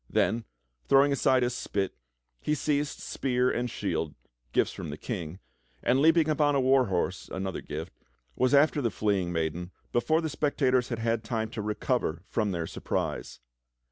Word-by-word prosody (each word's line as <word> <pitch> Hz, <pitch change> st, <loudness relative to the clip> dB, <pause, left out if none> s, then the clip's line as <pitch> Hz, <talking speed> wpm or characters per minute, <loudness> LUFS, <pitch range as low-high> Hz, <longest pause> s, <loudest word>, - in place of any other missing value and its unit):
Then, 115 Hz, 0 st, +1 dB, 0.4 s
throwing 140 Hz, +1 st, +5 dB
aside 130 Hz, -2 st, +3 dB
his 120 Hz, 0 st, 0 dB
spit, 100 Hz, -2 st, -2 dB, 0.5 s
he 150 Hz, -, +1 dB
seized 145 Hz, 0 st, 0 dB
spear 125 Hz, -1 st, 0 dB
and 120 Hz, +1 st, -1 dB
shield, 80 Hz, -8 st, -2 dB, 0.4 s
gifts -, -, +2 dB
from -, -, -6 dB
the 75 Hz, -, -5 dB
King, 90 Hz, -5 st, -5 dB, 0.5 s
and 130 Hz, +2 st, +3 dB
leaping 160 Hz, +1 st, +5 dB
upon 150 Hz, -2 st, +3 dB
a -, -, +3 dB
war 130 Hz, -1 st, +4 dB
horse, 95 Hz, 0 st, -1 dB
another 95 Hz, -1 st, -3 dB
gift, 80 Hz, +4 st, -6 dB, 0.4 s
was 130 Hz, +2 st, +3 dB
after 145 Hz, +1 st, +4 dB
the 120 Hz, -, +1 dB
fleeing 95 Hz, -3 st, 0 dB
maiden 85 Hz, +1 st, -2 dB, 0.2 s
before 155 Hz, +7 st, +3 dB
the 165 Hz, -, -1 dB
spectators 135 Hz, -4 st, +1 dB
had 120 Hz, -, -2 dB
had 115 Hz, 0 st, 0 dB
time 110 Hz, -1 st, -2 dB
to 110 Hz, -, -4 dB
recover 105 Hz, -, -1 dB
from 105 Hz, 0 st, 0 dB
their 85 Hz, -3 st, -2 dB
surprise. 65 Hz, -, -3 dB
120 Hz, 165 wpm, -28 LUFS, 95-140 Hz, 0.5 s, throwing